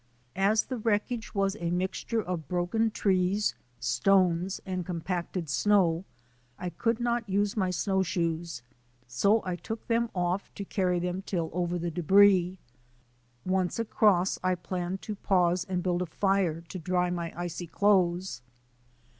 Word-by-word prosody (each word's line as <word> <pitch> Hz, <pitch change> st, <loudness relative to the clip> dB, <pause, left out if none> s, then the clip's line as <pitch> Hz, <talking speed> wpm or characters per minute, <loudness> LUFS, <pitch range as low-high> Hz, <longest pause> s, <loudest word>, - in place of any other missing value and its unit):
As 200 Hz, +3 st, +3 dB
the 255 Hz, -, -5 dB
wreckage 220 Hz, +1 st, -1 dB
was 195 Hz, 0 st, +1 dB
a 170 Hz, -, -2 dB
mixture 190 Hz, +5 st, -1 dB
of 175 Hz, -5 st, -4 dB
broken 180 Hz, +6 st, +1 dB
trees, 195 Hz, 0 st, +1 dB, 0.3 s
stones, 180 Hz, +8 st, +2 dB
and 185 Hz, -2 st, -3 dB
compacted 175 Hz, 0 st, -3 dB
snow 180 Hz, +1 st, +2 dB, 0.5 s
I 180 Hz, -1 st, -4 dB
could 230 Hz, +7 st, 0 dB
not 235 Hz, -2 st, -1 dB
use 200 Hz, +1 st, +1 dB
my 190 Hz, -4 st, +1 dB
snowshoes, 170 Hz, -, -1 dB, 0.4 s
so 200 Hz, -, +2 dB
I 180 Hz, -1 st, -1 dB
took 220 Hz, +5 st, -6 dB
them 230 Hz, 0 st, +1 dB
off 180 Hz, +2 st, -1 dB
to 200 Hz, -, -5 dB
carry 185 Hz, -3 st, 0 dB
them 180 Hz, +2 st, -2 dB
till 170 Hz, -4 st, -3 dB
over 175 Hz, 0 st, -1 dB
the 170 Hz, 0 st, -3 dB
debris. 185 Hz, +2 st, +4 dB, 0.9 s
Once 185 Hz, -1 st, 0 dB
across 210 Hz, -5 st, +2 dB
I 185 Hz, 0 st, +2 dB
planned 180 Hz, +2 st, -4 dB
to 215 Hz, -, -4 dB
pause 180 Hz, -2 st, +2 dB
and 180 Hz, -2 st, -1 dB
build 180 Hz, -1 st, 0 dB
a 180 Hz, -, -2 dB
fire 190 Hz, -2 st, +1 dB
to 175 Hz, +2 st, -8 dB
dry 180 Hz, +1 st, 0 dB
my 170 Hz, -1 st, -3 dB
icy 175 Hz, 0 st, -4 dB
clothes. 180 Hz, -5 st, +2 dB
185 Hz, 145 wpm, -29 LUFS, 175-200 Hz, 0.9 s, debris